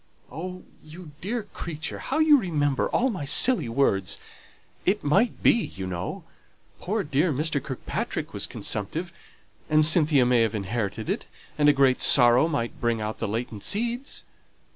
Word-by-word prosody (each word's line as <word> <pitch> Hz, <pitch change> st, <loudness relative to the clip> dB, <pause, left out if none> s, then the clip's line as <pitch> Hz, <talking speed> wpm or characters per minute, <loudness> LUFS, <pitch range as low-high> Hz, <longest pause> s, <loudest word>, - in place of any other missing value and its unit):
"Oh, 180 Hz, +4 st, -7 dB, 0.2 s
you 155 Hz, +1 st, -12 dB
dear 225 Hz, +4 st, -3 dB
creature, 165 Hz, -5 st, -7 dB
how 275 Hz, -, -3 dB
you 310 Hz, -2 st, +5 dB
remember 145 Hz, -, -1 dB
all 260 Hz, +1 st, +1 dB
my 185 Hz, -8 st, -5 dB
silly 145 Hz, -, +3 dB
words! 105 Hz, -7 st, +1 dB, 0.7 s
It 205 Hz, +3 st, 0 dB
might 195 Hz, +12 st, +1 dB
be, -, -, +7 dB
you 95 Hz, -, -4 dB
know. 90 Hz, 0 st, -5 dB, 0.6 s
Poor 210 Hz, +2 st, -2 dB
dear 145 Hz, +4 st, 0 dB
Mr. 150 Hz, +1 st, -1 dB
Kirkpatrick 130 Hz, -3 st, -5 dB
was -, -, -1 dB
consumptive, 165 Hz, -, -4 dB, 0.6 s
and 155 Hz, 0 st, +4 dB
Cynthia 155 Hz, -4 st, +5 dB
may 120 Hz, -1 st, +3 dB
have 110 Hz, -1 st, 0 dB
inherited 105 Hz, +1 st, -3 dB
it, -, -, -3 dB, 0.3 s
and 150 Hz, -1 st, +4 dB
a -, -, +8 dB
great 135 Hz, -2 st, +2 dB
sorrow 125 Hz, +3 st, +6 dB
might 140 Hz, -8 st, -4 dB
bring 120 Hz, -1 st, 0 dB
out 110 Hz, 0 st, -5 dB
the 115 Hz, -, -2 dB
latent 110 Hz, 0 st, -4 dB
seeds. 240 Hz, -, -2 dB
145 Hz, 155 wpm, -25 LUFS, 120-185 Hz, 0.7 s, a